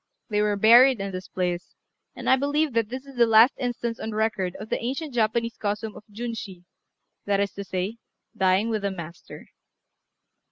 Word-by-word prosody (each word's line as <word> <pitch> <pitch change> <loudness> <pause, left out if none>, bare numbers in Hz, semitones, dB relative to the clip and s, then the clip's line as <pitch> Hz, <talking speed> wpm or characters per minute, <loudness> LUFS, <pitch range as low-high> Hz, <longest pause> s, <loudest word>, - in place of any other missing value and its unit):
They 210 0 +2
were 210 -1 +1
buried 235 +4 +6
in 195 0 -3
this 185 0 -6
place; 180 -1 -3 0.4
and - - -7
I 260 - +6
believe 285 +2 0
that 225 -2 +1
this 260 +2 -6
is 275 -2 -13
the 235 -1 +5
last 225 +4 +6
instance 240 -2 -3
on 220 - -4
record 210 -4 -1
of 215 +2 -8
the - - -2
ancient 275 +4 -3
Japanese 230 0 0
custom 210 +1 -3
of - - -11
Junshi, 215 -5 -6 0.6
that 200 -1 +1
is 200 0 0
to 200 - -6
say, 190 +4 -3 0.4
"dying 190 +4 +2
with 215 -2 -1
the 200 - 0
master." 170 -3 -9
220 Hz, 185 wpm, -25 LUFS, 195-240 Hz, 0.6 s, buried